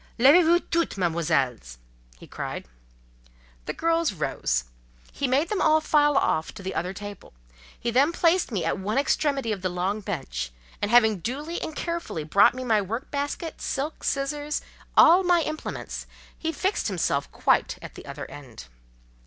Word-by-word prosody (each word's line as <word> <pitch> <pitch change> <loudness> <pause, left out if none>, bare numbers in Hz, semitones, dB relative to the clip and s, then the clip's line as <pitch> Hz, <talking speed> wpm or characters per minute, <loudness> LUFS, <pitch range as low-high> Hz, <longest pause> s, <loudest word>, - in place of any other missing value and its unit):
"Levez 280 +9 +7
vous 340 +2 +5
toutes, 335 - -1
Mesdemoiselles!" 155 - 0 0.5
cried - - -5
he. - - -31 0.4
The - - -2
girls 330 -5 +1
rose. 65 - -1 0.5
He 280 - -2
made 275 +6 +2
them 420 - -1
all 315 0 +5
file 295 -2 +3
off 160 -10 +1
to 195 - -9
the 190 - -4
other 180 +2 -2
table. 205 - -9 0.5
He 235 - -1
then 275 +6 +4
placed 340 -2 +2
me 185 -7 -1
at 165 - -1
one 210 +5 -2
extremity 275 -3 +1
of 200 -3 -3
the 185 - -1
long 185 +4 -1
bench, 160 - -4 0.3
and 205 - 0
having 220 -4 +5
duly 290 - -4
and 315 - -5
carefully 335 - -3
brought 195 +9 +5
me 255 - -5
my 220 -4 +2
work 225 +7 -5
basket, 290 +3 -4
silk, 290 +3 -3
scissors, 290 +2 -1 0.3
all 345 +4 +8
my 350 -2 +3
implements, 310 0 -5 0.3
he 325 - -3
fixed 375 +6 -1
himself 165 -8 -1
quite - - +1
at - - -10
the - - -12
other - - -6
end. 125 - -11
235 Hz, 165 wpm, -26 LUFS, -, 0.5 s, all